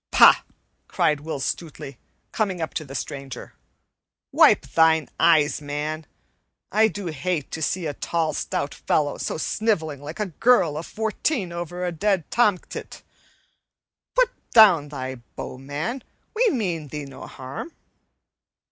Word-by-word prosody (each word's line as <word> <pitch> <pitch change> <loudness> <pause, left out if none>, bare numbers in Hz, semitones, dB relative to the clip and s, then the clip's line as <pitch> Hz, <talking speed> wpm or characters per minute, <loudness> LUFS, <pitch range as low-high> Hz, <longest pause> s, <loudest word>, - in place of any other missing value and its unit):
"Pah!" - - +8 0.5
cried 150 -1 +1
Will 150 -1 -5
Stutely, 140 -2 -5 0.3
coming 195 -5 -1
up 160 - -3
to 175 -4 -2
the 135 -2 -10
stranger, 135 0 -6 0.8
"wipe - - +5
thine 160 -3 +3
eyes, 150 -4 +4
man! 150 +2 -4 0.6
I 220 +2 +5
do 205 -2 -6
hate 165 -1 -2
to 160 - -5
see 175 +3 -1
a 150 - -2
tall, 160 +1 -1
stout 140 0 -2
fellow 145 -2 0
so - - -2
sniveling 160 -7 -1
like 150 +7 -8
a 210 - +1 0.2
girl 230 -11 +4
of 160 +3 -5
fourteen 220 - -1
over 175 +1 -4
a 175 - -1
dead 190 +1 +1
tomtit. 210 -7 0 1.1
Put - - +4 0.2
down 180 -10 +7
thy 130 -2 -5 0.2
bow, 130 - -6
man! 150 - -4 0.3
We 475 +1 +4
mean 180 - -2
thee 150 0 -6
no 135 -1 -10
harm." 135 - -7
160 Hz, 140 wpm, -24 LUFS, 145-195 Hz, 1.1 s, Pah